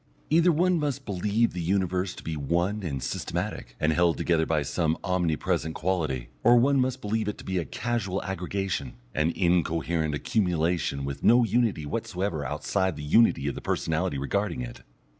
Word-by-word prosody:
Either 170 +3 +5
one 175 +2 +2
must 140 -2 -2
believe 105 +4 +1
the 90 - -3
Universe 90 +1 0
to - - -11
be 80 - -3
one 85 +8 0
and 70 -8 -3
systematic, - - -4
and 80 +1 +2
held 85 0 +3
together 80 -2 +1
by 75 -2 +1
some 80 +1 0
omnipresent 80 -3 0
quality, 75 -10 -1
or 120 +1 +7
one 135 +3 +4
must 130 0 -1
believe 110 +1 -1
it 105 - -3
to - - -11
be 95 -1 -1
a 85 - -3
casual 105 - -2
aggregation, 95 -6 -3 0.2
an 75 +1 +1
incoherent 85 -3 +1
accumulation 85 -6 0
with 70 -1 -5
no 120 +2 +6
unity 115 -7 +1
whatsoever 85 +2 -2
outside 80 +6 -1
the 75 - -7
unity 75 -1 +4
of 70 - 0
the - - -7
personality 70 - -1
regarding 70 -2 -1
it. - - -7
90 Hz, 170 wpm, -27 LUFS, 80-105 Hz, 0.2 s, or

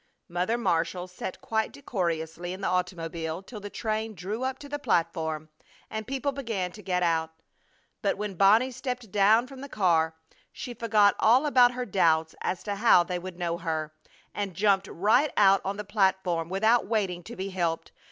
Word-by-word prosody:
Mother 180 +7 -1
Marshall 175 -4 0
sat 180 +1 -7
quite 220 -1 -1
decorously 175 - -3
in 190 - -8
the - - -1
automobile 170 -2 -2
till 215 +2 -9
the 205 0 -7
train 220 0 -3
drew 195 +7 -4
up 260 0 -2
to 290 - -10
the 290 +1 -4
platform 160 - -1 0.4
and 220 -1 -4
people 275 +2 -1
began 225 -10 -3
to 210 - -12
get 180 -2 0
out. 165 -2 +1 0.7
But 200 -2 0
when 205 -1 -3
Bonnie 210 +8 +4
stepped 250 -4 -5
down 210 +4 +4
from 265 0 -11
the 280 - -8
car 165 -7 +2 0.4
she 245 - -7
forgot 215 -3 +3
all 250 +6 +5
about 250 -4 +5
her 250 0 -3
doubts 160 -5 +2
as 180 - -2
to 205 -1 -3
how 200 -5 +6
they 180 0 -3
would 180 0 -8
know 170 -1 -2
her, 155 -2 -3 0.4
and 200 -3 -4
jumped 195 0 +2
right 225 - +2
out 195 -2 +6
on 195 +1 -3
the 210 - -4
platform 190 -5 +1
without 220 +5 +2
waiting 195 -5 -1
to 235 - -8
be 195 -1 -4
helped. 170 -3 -2
195 Hz, 180 wpm, -27 LUFS, 175-225 Hz, 0.7 s, how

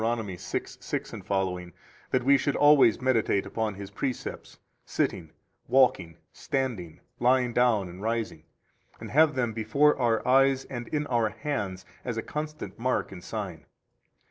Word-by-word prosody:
6:6ff 95 -3 -3 0.4
that 130 -1 +1
we 140 +2 +6
should 140 +1 0
always 145 -6 +6
meditate 120 -6 +1
upon 110 -3 -2
His 100 0 -8
precepts, 130 +4 -5 0.3
sitting, - - -2 0.4
walking, 120 -10 +3 0.2
standing, 115 -12 -3 0.2
lying 125 0 +3
down, 115 -6 +3
and 90 +2 -10
rising, 115 -7 -2 0.6
and - - -8
have 155 +1 +4
them 120 -3 0
before 140 +7 +3
our 115 -2 +1
eyes 135 +1 +4
and 120 -3 -6
in 150 -1 -1
our 120 -5 +1
hands 105 -9 -4 0.2
as 120 -3 -3
a 115 - -2
constant 150 -4 -6
mark 130 -2 0
and 90 -2 -10
sign. 95 -4 -6
120 Hz, 135 wpm, -27 LUFS, 100-130 Hz, 0.6 s, we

